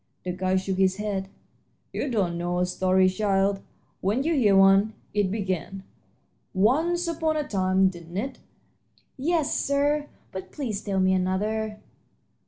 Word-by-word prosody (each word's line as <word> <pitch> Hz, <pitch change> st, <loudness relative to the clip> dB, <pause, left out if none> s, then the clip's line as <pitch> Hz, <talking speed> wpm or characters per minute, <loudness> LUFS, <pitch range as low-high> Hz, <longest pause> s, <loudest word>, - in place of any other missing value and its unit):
The 180 Hz, -, -2 dB
guide 185 Hz, +1 st, 0 dB
shook 190 Hz, 0 st, -3 dB
his 190 Hz, -1 st, +3 dB
head. 195 Hz, -2 st, -3 dB, 0.6 s
"You 285 Hz, -, -2 dB
don't 195 Hz, -8 st, 0 dB
know 175 Hz, +1 st, -2 dB
a 180 Hz, -, +2 dB
story, 185 Hz, +1 st, +2 dB
child, 195 Hz, 0 st, +1 dB, 0.4 s
when 210 Hz, +8 st, 0 dB
you 330 Hz, +3 st, +1 dB
hear 220 Hz, -9 st, +4 dB
one. 195 Hz, +3 st, +5 dB, 0.2 s
It 205 Hz, -2 st, +1 dB
began, 190 Hz, -2 st, -3 dB, 0.7 s
'Once 320 Hz, -, +2 dB
upon 320 Hz, -1 st, 0 dB
a 300 Hz, -, -2 dB
time,' 190 Hz, -1 st, +2 dB
didn't 170 Hz, -1 st, -9 dB
it?" 260 Hz, +6 st, -3 dB, 0.8 s
"Yes, 310 Hz, +2 st, 0 dB
sir; 290 Hz, +1 st, +1 dB, 0.2 s
but 190 Hz, 0 st, -7 dB
please 225 Hz, -8 st, -3 dB
tell 195 Hz, -2 st, -1 dB
me 185 Hz, 0 st, +3 dB
another." 210 Hz, +4 st, -1 dB
195 Hz, 145 wpm, -26 LUFS, 185-255 Hz, 0.8 s, one